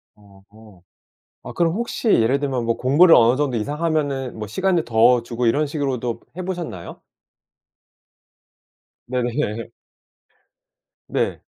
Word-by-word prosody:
어. 100 0 -19 0.6
아 - - -8
그럼 170 -1 +1
혹시 235 +2 -2
예를 130 - +3
들면 135 -4 -2
뭐 115 0 0
공부를 155 +7 +5
어느 120 +2 +4
정도 140 -4 0
이상 145 +8 -4
하면은 140 -6 -1
뭐 105 -1 -5
시간을 180 - 0
더 115 +1 +4
주고 120 +1 -3
이런 145 +7 +2
식으로도 135 -5 -3 0.2
해 185 - -4
보셨나요? 175 - -6 2.1
네네. 120 -3 -2 1.4
네. - - -1
125 Hz, 230 characters per minute, -21 LUFS, 115-155 Hz, 2.1 s, 공부를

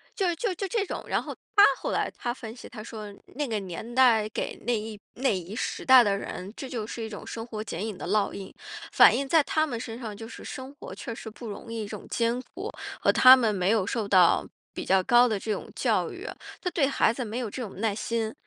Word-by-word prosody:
就 370 -6 +1
就 405 +3 -1
就 390 +3 -3
这 410 0 0
种。 - - -5
然 - - +1
后 - - -6 0.2
他 405 - +8
后 - - -3
来 - - 0
他 240 - -2
分 230 -3 -9
析， - - -11
他 220 -2 -8
说： 215 -2 -8 0.2
“那 290 +1 -1
个 220 -3 -1
年 195 +6 -7
代 235 -5 +5
给 - - -3
那 240 -1 +2
一 215 -1 -7 0.2
那 265 +2 +1
一 185 +4 -7
时 - - -3
代 260 -2 +9
的 200 -3 +2
人， 195 -1 -6
这 265 - -7
就 230 -4 -3
是 230 +1 -6
一 220 - -5
种 205 - -8
生 225 0 -6
活 215 -3 -5
剪 200 -1 -4
影 215 -4 -5
的 - - -6
烙 205 +2 +2
印。 195 -1 -8 0.4
“反 - - +7
映 275 - -1
在 315 +2 +5
他 310 +2 +1
们 245 -7 -4
身 230 0 -6
上， 220 -4 -6
就 225 +2 -8
是 - - -10
生 260 +1 -7
活 285 - -9
确 230 - -6
实 225 - -8
不 230 +2 -10
容 215 +2 -8
易 225 -2 -3
这 - - -6
种 - - -14
艰 235 +1 0
苦， - - -7 0.3
和 - - +4
他 255 0 +9
们 230 -5 +1
没 185 -1 0
有 215 -3 +3
受 215 +1 -2
到 185 -4 +5 0.3
比 - - -5
较 190 0 +4
高 240 +3 +6
的 215 -4 -1
这 215 - -3
种 210 - -4
教 - - +1
育， - - -8 0.3
他 360 - -1
对 305 -5 +2
孩 265 -4 +2
子 250 0 -4
没 220 +2 -5
有 240 -4 -3
这 255 - -6
种 195 -4 -8
耐 220 -2 +1
心， 225 0 -2
225 Hz, 275 characters per minute, -27 LUFS, 210-255 Hz, 0.4 s, 代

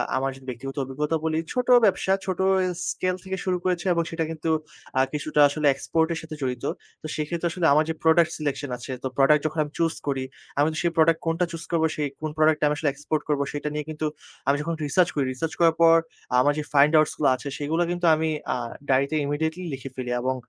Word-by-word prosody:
আমার 135 +1 0
যদি 135 -1 -15
ব্যক্তিগত 135 +3 -6
অভিজ্ঞতা 150 +4 -2
বলি। 160 0 0 0.2
ছোট 250 0 -1 0.2
ব্যবসা, 190 -1 +2
ছোট 185 -2 -3 0.3
এ - - 0 0.2
স্কেল 185 0 -1
থেকে 190 0 -4
শুরু 180 -1 +1
করেছি 180 0 -1
এবং 170 0 +1
সেটা 165 0 -1
কিন্তু 160 0 -3 0.5
আ - - +5
কিছুটা 150 0 -1
আসলে 150 0 0
এক্সপোর্টের 160 +4 0
সাথে 160 -1 -8
জড়িত। 125 -1 -3 0.4
তো 155 - -6
সেক্ষেত্রে 165 +3 -2
আসলে 175 -1 -1
আমার 155 +1 +4
যে - - 0
প্রোডাক্ট 160 0 +4
সিলেকশন 145 -2 -3
আছে। 120 +2 -8
তো - - 0
প্রোডাক্ট 145 +2 +5
যখন 155 +1 -1
আমি 150 - -9
চুস 165 -1 +1
করি, 135 -2 0 0.3
আমি 145 - +4
কিন্তু 155 - -4
সেই 170 - +2
প্রোডাক্ট 165 0 +4
কোনটা 165 +2 +1
চুস 165 -1 -6
করবো 160 -1 +2
সেই 150 -1 -1
কোন 155 - -2
প্রোডাক্ট 155 0 +4
টা - - +4
আমি 150 - 0
আসলে 150 -2 +1
এক্সপোর্ট 150 +2 -2
করব 145 -1 +1
সেটা 145 +1 -3
নিয়ে 150 -1 -3
কিন্তু 155 0 -3 0.4
আমি 140 - +4
যখন 165 +1 -2
রিসার্চ 170 +5 +3
করি। 140 -2 +1
রিসার্চ 160 +5 -3
করার 165 -1 +5
পর 165 0 +7 0.4
আমার 145 +3 +4
যে - - -2
ফাইন্ড 145 +3 +5
আউটসগুলো 155 -1 +2
আছে 135 - -8
সেগুলা 160 +4 0
কিন্তু 175 0 -2
আমি 160 0 0 0.2
আ - - -1 0.3
ডায়রিতে 140 +3 +2
ইমিডিয়েটলি 160 +5 -2
লিখে 135 0 -6
ফেলি। 125 -1 -4
এবং 130 +1 0
155 Hz, 220 wpm, -25 LUFS, 145-165 Hz, 0.5 s, পর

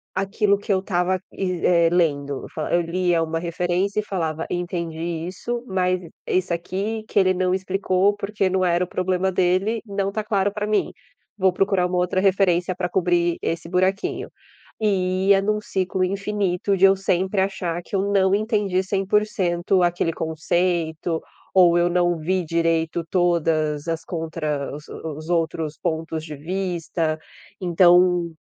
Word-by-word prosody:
aquilo 200 +1 +1
que 205 - -4
eu 190 - +3
estava, 185 -1 0
eh, 180 -2 +2
é - - +3
lendo. 145 -5 0
Eu - - -7
fa 155 - -3
eu 175 - +4
lia 175 0 +1
uma 165 0 -1
referência 175 +4 -1
e - - -1
falava: 165 -5 -3
"Entendi 170 -1 -3
isso." 235 +6 -4
Mas 185 -2 0
e 165 - -11 0.2
esse 185 -1 0
aqui 200 +6 -3
que - - +2
ele 185 -1 +4
não 185 0 0
explicou, 190 +1 +1
porque 200 -1 -1
não 185 0 +1
era 175 0 +2
o - - -16
problema 185 +1 0
dele 185 +5 +1
não 200 -1 -2
tá 215 +1 -3
claro 200 -2 +1
para 210 0 -2
mim. 210 0 0 0.5
Vou 190 -1 +3
procurar 190 -1 +1
uma 180 - -2
outra 180 +1 +1
referência 185 -2 +2
pra 180 -1 -2
cobrir 175 -1 +1
esse 165 0 -3
buraquinho. 185 +3 0 0.5
E 190 -2 +1
ia 195 -1 +6
num 210 +1 0
ciclo 190 -2 -1
infinito 195 0 0
de 195 - +5
eu 195 0 +6
sempre 190 +1 0
achar 180 -3 -2
que 200 - -6
eu 190 - +2
não 190 -1 +3
entendi 205 -3 0
100% 190 -2 +1
aquele 175 -1 +1
conceito, 160 0 -1 0.3
ou 175 -2 +6
eu 175 0 +3
não 175 -1 +2
vi 180 +3 -1
direito 165 0 0
todas 165 -4 +1
as 165 0 -2
contra 160 -4 -3
os 150 - -11
os 155 0 -7
outros 160 -3 -1
pontos 160 -1 -3
de 155 -2 -7
vista, 165 -1 -2 0.4
então 175 -1 +4
180 Hz, 160 wpm, -23 LUFS, 170-195 Hz, 0.5 s, ia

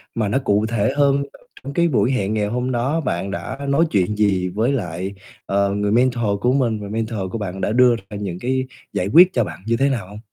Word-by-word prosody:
mà 110 -3 0
nó 105 - +1
cụ 105 -1 +2
thể 110 -2 0
hơn, 140 -1 +4 0.2
trong - - -18 0.2
trong 140 - -6
cái 170 +3 +3
buổi 125 -5 +2
hẹn 105 -5 0
ngày 105 -1 0
hôm 125 +4 -2
đó 130 +7 0
bạn 95 - -2
đã 130 +6 -5
nói 155 +5 +3
chuyện 100 +1 +1
gì 100 -3 +1
với 110 +8 0
lại, 95 -4 -3 0.3
ờ, 100 0 +1
người 105 0 0
mentor 120 -4 +1
của 125 +1 +2
mình 120 -6 +1
và 100 -1 -7
mentor 110 0 -3
của - - -3
bạn 95 -3 -5
đã - - 0
đưa 125 0 +5
ra 100 0 -9
những 95 -4 -5
cái 130 +3 0 0.3
giải 90 - -1
quyết 175 - +6
cho - - +2
bạn 85 0 -7
như 115 +1 +1
thế 135 +2 +2
nào 115 -8 -2
hông? 105 +2 -10
110 Hz, 245 wpm, -21 LUFS, 100-125 Hz, 0.3 s, quyết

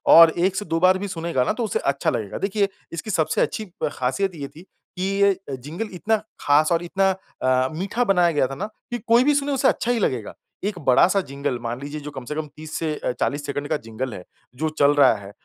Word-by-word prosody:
और 165 0 +10
1 185 +2 +2
से 205 - -2
2 165 -2 -1
बार 185 +1 +5
भी 200 +2 -4
सुनेगा 170 -7 -1
न - - +2
तो 240 - -1
उसे 215 - -1
अच्छा 140 +4 0
लगेगा। 115 -8 -3
देखिए, 200 0 0 0.2
इसकी 170 +6 -5
सबसे 160 -4 +1
अच्छी 220 - -1 0.3
खासियत 170 +9 -1
ये 140 -3 -5
थी 155 +4 -14
कि 185 0 -10 0.2
ये 200 -2 +4 0.2
जिंगल 160 - -6
इतना 220 +5 +1 0.2
खास 150 +3 +4
और 170 0 +2
इतना 195 +2 +1 0.3
अ, 130 0 +3
मीठा 200 +8 -1
बनाया 180 -6 +3
गया 145 -4 +2
था 135 - -6
ना 195 - -3 0.3
कि 240 - -1
कोई 235 +2 +6
भी 295 +1 +3
सुने 285 0 0
उसे 270 -1 +2
अच्छा 240 - +1
ही 240 - +1
लगेगा। 125 - -1 0.3
एक 205 -2 -2
बड़ा-सा 165 +8 +4
जिंगल 140 -2 -2
मान 120 +1 -4
लीजिए 145 +2 -5
जो 150 0 -7
कम 130 -3 -8
से 150 - -5
कम 155 0 -3
30 155 0 -9
से 160 -2 -1
अ, 125 - -2
40 145 +1 -1
सेकंड 145 0 -3
का - - +1
जिंगल 115 +1 -5
है 90 - -8 0.3
जो 155 +4 -1
चल 145 0 +5
रहा 145 - +6
है 100 0 -10
160 Hz, 235 wpm, -23 LUFS, 140-195 Hz, 0.3 s, और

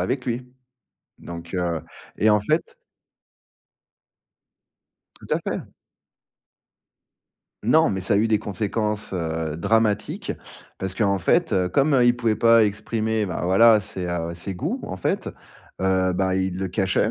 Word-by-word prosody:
avec 125 +8 -1
lui. 125 +1 -4 0.7
Donc, 85 +2 -8
heu, 85 -3 -1 0.4
et 110 - +3
en 105 0 +5
fait 155 - -1 2.4
Tout - - -15
à - - +3
fait. - - -3 2.0
Non, 160 +1 +4
mais 95 - -2
ça 95 +2 0
a - - +4
eu 110 +2 +2
des 110 - +3
conséquences, 105 +1 -2
heu, 80 -3 -2
dramatiques, 110 +3 0 0.5
parce 95 -1 -3
qu'en 100 -2 +1
fait, 160 - +2
heu, 90 -1 +2
comme, 140 +9 +2
heu, 125 -2 +5
il 120 - +5
pouvait 115 -3 +1
pas 115 -1 +5
exprimer, 110 +1 -1
bah, 90 - -4
voilà 105 +4 +6
ses, 95 -2 -5
heu, 85 -1 -2
ses 90 +3 -6
goûts, 90 - -2
en - - -5
fait, - - -1 0.5
heu, 95 -1 +2
ben, 95 +1 0
il 95 -1 -1
le 95 0 -2
cachait 95 +3 +1
100 Hz, 145 wpm, -23 LUFS, 90-115 Hz, 2.4 s, voilà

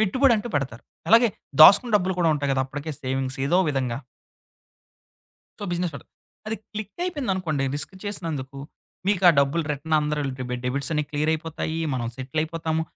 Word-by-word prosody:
పెట్టుబడంటూ 235 +1 +3
పెడతారు. 130 -5 -2 0.3
అలాగే 230 +2 +7 0.3
దాసుకుని 220 +9 +9
డబ్బులు 190 -1 -1
కూడా 165 -2 +4
ఉంటాయి 145 -1 -1
కదా! 130 0 +1
అప్పటికే 145 +3 -5
సేవింగ్స్ 130 0 -2
ఏదో 175 +6 +3
విధంగా. 130 -4 -1 1.6
సో, - - -9
బిజినెస్ 175 -1 -1
పడు - - -9 0.4
అది 220 +1 -2 0.2
క్లిక్కయిపోయిందనుకోండి 210 - -2
రిస్క్ 145 +6 -5
చేసినందుకు, 150 -9 -4 0.5
మీకు 200 -2 +1
ఆ - - +10
డబ్బులు 140 +4 +2
రిటర్న్ 150 +2 -2
అందరె 150 0 -1 0.5
డెబిట్సన్నీ 140 +4 -1
క్లియర్ 150 +1 0
అయిపోతాయి, 160 0 -4 0.2
మనం 120 -2 -2
సెటిలయిపోతాము. 160 +4 -2
160 Hz, 135 wpm, -24 LUFS, 140-190 Hz, 1.6 s, ఆ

